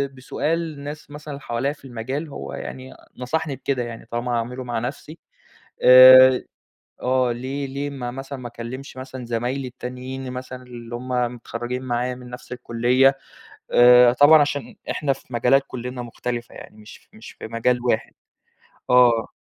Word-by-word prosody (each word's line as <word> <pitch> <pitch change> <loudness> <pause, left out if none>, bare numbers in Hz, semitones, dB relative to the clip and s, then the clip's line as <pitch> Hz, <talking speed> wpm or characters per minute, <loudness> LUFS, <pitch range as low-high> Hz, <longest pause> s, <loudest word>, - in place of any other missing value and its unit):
بسؤال 160 +5 -2
الناس 145 +1 -9
مثلًا 150 -1 -8
حواليّا 135 +2 -2
في 140 - -19
المجال، 130 +6 -5
هو - - -7
يعني 130 0 -8 0.2
نصحني 145 +3 -2
بكده 130 -1 -2
يعني 115 -1 -8
طالما 120 +1 -3
هاعمله 120 +2 -3
مع 120 -2 -3
نفسي، 140 +6 -7 0.6
آآ 130 0 +9 0.6
آه، 130 -1 +1
ليه 135 +4 -4
ليه 140 +2 -4
ما 125 -4 -5
مثلًا 135 +1 -7
ما 125 - -7
أكلِّمش 120 +3 -8
مثلًا 130 -1 -8
زمايلي 120 +3 -2
التّانيِّين 130 +1 -7
مثلًا 130 0 -7
اللي 120 -1 -9
هُم 125 +2 -7 0.3
متخرّجين 120 +1 -5
معايا 125 0 -2
من 125 0 -12
نفس 125 - -11
الكُلِّيَّة، 125 +2 +2 0.6
آآ 125 0 +7
طبعًا 145 +4 +7
عشان 145 -4 -2 0.2
إحنا 140 -2 0
في 130 -1 -16
مجالات 125 +4 +3
كُلنّا 125 0 -6
مختلفة 120 0 -5
يعني - - -12
مش 110 0 -15
مش 110 - -12
في - - -9
مجال 115 +2 0
واحد، 110 -2 0 0.8
آه. 120 -3 +5
125 Hz, 150 wpm, -22 LUFS, 120-135 Hz, 0.8 s, آآ